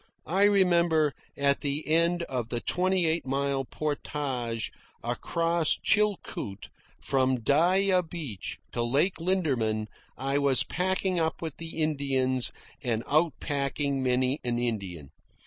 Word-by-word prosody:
I 190 +7 +3
remember, 170 -6 +3 0.2
at 140 0 +2
the 145 +2 -2
end 170 +2 +3
of 125 -7 -3
the 120 - -1
twenty 185 +5 +1
eight 160 +1 +1
mile 135 0 -1
portage 135 -6 -3 0.3
across 165 -1 +1
Chilcoot 205 - -1 0.3
from 130 -2 +1
Dyea 180 - +3
Beach 145 - -5
to 120 - -2
Lake 140 +11 +1
Linderman, 130 - 0 0.3
I 135 +1 0
was 140 -2 +3
packing 185 0 0
up 160 +1 -1
with 160 -3 -5
the 165 -1 -6
Indians 135 -4 +2 0.3
and 115 -4 -1
out 155 +2 +3
packing 140 -1 -1
many 130 +2 +1
an 120 -1 -1
Indian. 95 - -3
145 Hz, 125 wpm, -28 LUFS, 130-170 Hz, 0.3 s, I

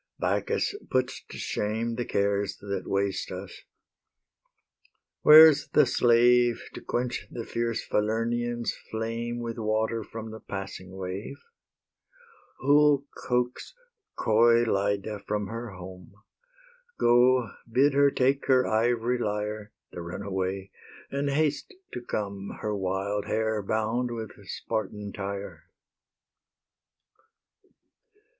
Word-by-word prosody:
Bacchus 435 - 0 0.2
puts 130 0 -1
to - - -10
shame 110 +3 -2
The 120 +1 -3
cares 100 0 0
that 100 -2 -5
waste 100 0 -1
us. 95 0 -8 1.6
Where's 155 -1 +9
the 150 - +6
slave 120 0 +4
To - - -8
quench 125 +1 -2
the 115 -2 -6
fierce 115 -1 -2
Falernian's 115 +2 -1
flame 115 +2 -3
With 115 0 -5
water 110 +1 0
from 110 +1 -8
the 110 - -8
passing 95 -2 -7
wave? 95 - -6 1.2
Who'll 145 0 +4
coax 125 - -2 0.4
coy 115 +2 +4
Lyde 100 -2 0 0.2
from 105 -1 -1
her 115 -1 -6
home? 90 0 -11 0.8
Go, 120 -1 +4 0.2
bid 135 +4 +4
her 140 0 +5
take 135 +1 +1
her 130 -1 +4
ivory 120 +2 +1
lyre, 105 -1 -3 0.2
The 85 - -7
runaway, 95 +2 -4 0.4
and 140 +1 -1
haste 150 - 0 0.2
to 125 - -4
come, 100 -4 -4
Her 105 -1 -1
wild 100 +2 -2
hair 110 -1 0
bound 110 +4 -1
with 115 -2 -5 0.2
Spartan 105 -2 -4
tire. 100 0 -6
110 Hz, 110 wpm, -27 LUFS, 100-120 Hz, 1.6 s, Where's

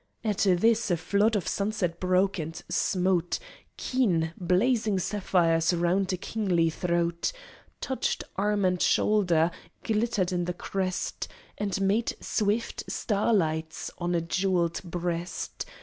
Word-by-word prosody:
At 210 -3 -1
this 220 +5 +3
a 175 - +2
flood 205 +6 +2
of 195 - -1
sunset 200 -4 -1
broke, 185 +1 +2
and 160 +1 -5
smote 180 -2 +1 0.4
Keen, 175 -11 +1
blazing 205 +4 +2
sapphires 175 -4 +2
round 180 +3 +1
a 185 - -1
kingly 180 -5 0
throat, 170 0 0 0.5
Touched 265 - -1
arm 205 0 +1
and 180 -1 +1
shoulder, 175 -6 +3 0.3
glittered 215 -4 0
in 175 -1 0
the 180 - -2
crest, 185 0 -3 0.3
And 200 -2 -2
made 205 +4 +1
swift 215 +2 -1
starlights 165 -7 0
on 175 0 0
a 170 - +2
jewelled 175 0 0
breast. 175 0 -4
185 Hz, 120 wpm, -28 LUFS, 170-205 Hz, 0.5 s, this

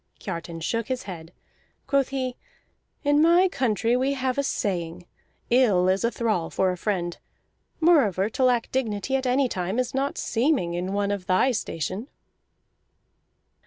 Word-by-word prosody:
Kiartan 170 -3 -6
shook 230 +5 -1
his 255 -4 -3
head. 170 -4 -8 0.5
Quoth 275 -2 +2
he: 260 -2 -3 0.7
"In 290 0 +3
my 345 +3 +5
country 235 - 0
we 265 +2 +1
have 260 0 -1
a - - +2
saying: 175 -8 -2 0.5
'Ill 215 -8 +4
is 190 +3 +2
a 235 - +3
thrall 215 -9 -1
for 190 -1 +1
a - - -3
friend.' 175 -2 -2 0.6
Moreover, 230 - +4
to 255 +4 -2
lack 245 -2 +2
dignity 255 0 -1
at 265 -1 0
any 260 +2 +3
time 185 -1 -3
is 255 -1 -1
not 275 +1 -1
seeming 235 - 0
in 180 +2 -3
one 200 0 0
of 200 -3 -4
thy 185 +8 +3
station." 195 - -3
225 Hz, 155 wpm, -25 LUFS, 185-265 Hz, 0.7 s, my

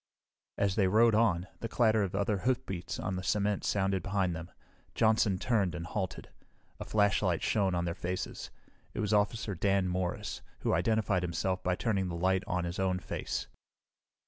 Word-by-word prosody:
As 100 -2 +2
they 95 -1 +3
rode 110 +4 +5
on, 100 -6 +3
the 115 - -3
clatter 110 -2 +3
of 95 -2 -1
other 100 0 0
hoofbeats 95 -8 -2
on 95 - -3
the - - -3
cement 105 +1 0
sounded 95 -2 +1
behind 95 -2 0
them. 80 +2 -7 0.5
Johnson 110 -3 +3
turned 100 -5 +1
and 85 -1 -5
halted. 95 +2 -4 0.5
A - - -5
flashlight 100 -4 +2
shone 95 -4 +1
in 85 0 0
their 85 - -1
faces. 90 +1 -4 0.5
It - - -3
was 105 0 0
Officer 105 0 +1
Dan 95 +1 +1
Morris, 90 0 -2 0.2
who - - +1
identified 100 +1 +2
himself 90 +2 -1
by 90 0 0
turning 100 -3 0
the 85 - -4
light 95 +2 +2
on 90 -1 0
his 85 +2 -4
own 95 -1 +1
face. 90 - -4
95 Hz, 170 wpm, -31 LUFS, 90-105 Hz, 0.5 s, rode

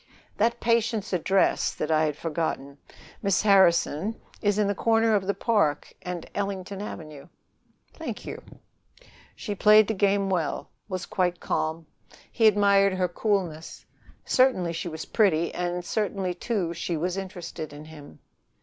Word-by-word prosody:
"That 235 +2 +1
patient's 230 -3 0
address 190 +2 +2
that 155 - -2
I 155 0 +3
had 150 -1 -2
forgotten, 150 -4 -3 0.4
Miss 200 -1 +1
Harrison, 190 0 +3 0.2
is 205 -1 +2
the 205 -1 +1
corner 225 +2 +2
of 195 -2 +1
the 200 - 0
Park 200 -9 0
and 180 -2 -6
Ellington 200 -1 -4
Avenue." 155 -8 -8 0.7
"Thank - - -6
you." - - -6 0.9
She 210 - -4
played 210 +1 +6
the 220 - 0
game 200 0 +2
well, 175 -6 -2 0.2
was 185 0 -3
quite 180 -2 -1
calm. 160 +1 -2 0.5
He 225 - +4
admired 200 -1 +4
her 185 -1 +1
coolness. 175 -4 -2 0.4
Certainly 245 -10 +2
she 170 - -4
was 160 0 -6
pretty, 170 -7 +2
and 175 0 -3
certainly, 195 -3 -1
too, 180 -2 -2
she 170 0 -3
was 175 +3 -1
interested 180 -5 -6
in 145 +1 -10
him. 150 - -13
185 Hz, 140 wpm, -26 LUFS, 165-205 Hz, 0.9 s, played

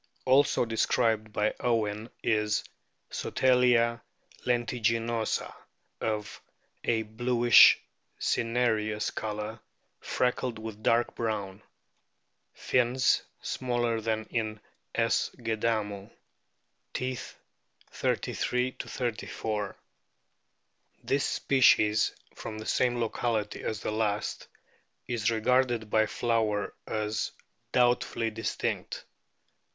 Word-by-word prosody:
Also 130 -1 +4
described 110 -1 +1
by 105 0 +1
Owen 110 -2 0
is 105 -1 +1 0.5
Sotalia 125 -2 +3 0.4
tentiginosa, 115 -2 0 0.5
of 105 -2 -3 0.4
a 115 -1 +1
bluish 120 +2 +6 0.4
cinereous 110 -3 0
colour, 105 +1 -4 0.4
freckled 125 -1 -1
with 110 -1 -7
dark 115 +2 +2
brown. 105 -3 -3 0.9
Fins 125 +1 +2 0.2
smaller 120 -3 -1
than 110 0 -1
in 110 -2 -2 0.4
S. - - +2
gadamu. 110 -3 -1 0.9
Teeth, 125 -1 -4 0.6
33 125 +1 -1
34. 110 -4 -3 1.3
This 140 +1 +1
species, 110 -5 +4 0.2
from 110 - -7
the 110 - -7
same 120 0 +1
locality 115 -2 -1
as 110 -1 -3
the - - -2
last, 105 -1 -1 0.6
is 120 -3 0
regarded 115 -1 +1
by 110 0 +4
Flower 110 -3 0
as 110 0 -2 0.4
doubtfully 120 -2 +2
distinct. 115 +1 -3
115 Hz, 85 wpm, -29 LUFS, 110-120 Hz, 1.3 s, bluish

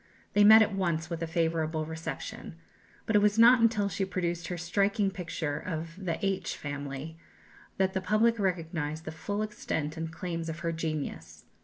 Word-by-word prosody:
They 205 - +5
met 220 +1 +9
at 210 - -2
once 170 -3 -1
with 170 -1 -3
a 165 - -1
favourable 160 -1 0
reception. 160 +1 -6 0.5
But 220 - 0
it 205 - +6
was 210 +1 +3
not 235 +2 +7
until 220 -3 +3
she 195 0 -2
produced 175 -2 -2
her 180 - -4
striking 200 +4 +1
picture 170 -5 -3
of 165 -1 -5
"The 170 -3 -1
H 190 -3 -1
Family" 145 +2 -6 0.6
that 190 0 +1
the 190 - -1
public 215 +4 +2
recognized 160 -5 -2
the 155 - -4
full 205 +6 -3
extent 160 -7 -3
and 160 0 -4
claims 165 0 -4
of 160 +1 -6
her 170 -1 -1
genius. 150 - -4
170 Hz, 175 wpm, -29 LUFS, 160-200 Hz, 0.6 s, met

